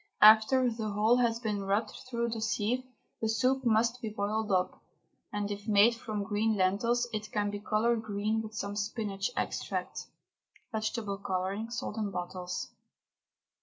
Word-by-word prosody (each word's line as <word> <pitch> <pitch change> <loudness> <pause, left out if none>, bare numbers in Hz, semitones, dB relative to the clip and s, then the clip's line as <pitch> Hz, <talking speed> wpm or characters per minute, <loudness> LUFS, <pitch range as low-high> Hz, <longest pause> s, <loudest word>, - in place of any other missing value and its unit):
After 220 +4 +7
the 225 -2 -2
whole 215 +4 +3
has 235 -2 +2
been 210 -4 -2
rubbed 200 +3 0 0.2
through 235 -1 -1
the 225 -1 -4
sieve 220 +3 0 0.4
the 220 - 0
soup 260 +4 +2
must 235 +1 +2
be 220 - -3
boiled 210 +1 -1
up, 185 -1 +1 0.5
and 205 0 -2
if 205 +1 -6
made 210 +2 +6
from 215 -3 -4
green 215 +2 +1
lentils 220 +6 +2
it 210 -1 -4
can 205 -1 0
be 205 - -4
coloured 220 +2 +1
green 215 +1 -1
with 220 0 -8
some 200 -1 -3
spinach 205 -2 -2
extract - - -3 0.6
(vegetable 215 -2 -2
colouring, 195 +3 -2
sold 240 -2 -4
in 215 -2 -1
bottles). 180 -1 -4
215 Hz, 155 wpm, -31 LUFS, 205-230 Hz, 0.6 s, After